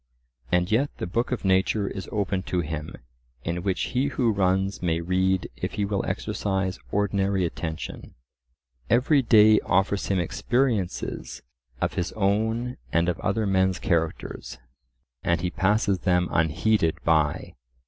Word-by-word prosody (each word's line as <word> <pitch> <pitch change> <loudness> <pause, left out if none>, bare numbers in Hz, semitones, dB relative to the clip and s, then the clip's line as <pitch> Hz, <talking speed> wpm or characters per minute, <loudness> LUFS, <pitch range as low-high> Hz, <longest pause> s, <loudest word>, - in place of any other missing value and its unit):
And 90 +3 +2
yet 135 +6 +2
the - - -3
book 115 +9 -1
of 120 -5 -2
nature 95 +2 +2
is 95 -3 -6
open 100 -2 -1
to 90 - +1
him, 75 -1 -5 0.5
in 85 +1 -2
which 95 0 -1
he 130 +3 +2
who 125 -5 +1
runs 95 0 +1
may 85 -2 0
read 95 +1 +1
if - - -4
he 105 - -1
will 100 -1 -1
exercise 95 -2 -2
ordinary 100 -2 +1
attention; 80 -1 -6 0.7
every 135 +4 +4
day 110 -3 +6
offers 95 +2 +1
him 95 - +1
experiences 110 +3 -1 0.4
of - - 0
his 90 - -2
own 110 +4 0
and 85 +1 +2
of 90 - -2
other 105 +2 0
men's 95 -1 +2
characters, 80 -7 -2 0.6
and 85 -1 +1
he 90 0 -1
passes 100 -1 +1
them 90 -1 +2
unheeded 80 +2 +2
by. 80 -3 +1
95 Hz, 140 wpm, -25 LUFS, 90-105 Hz, 0.7 s, day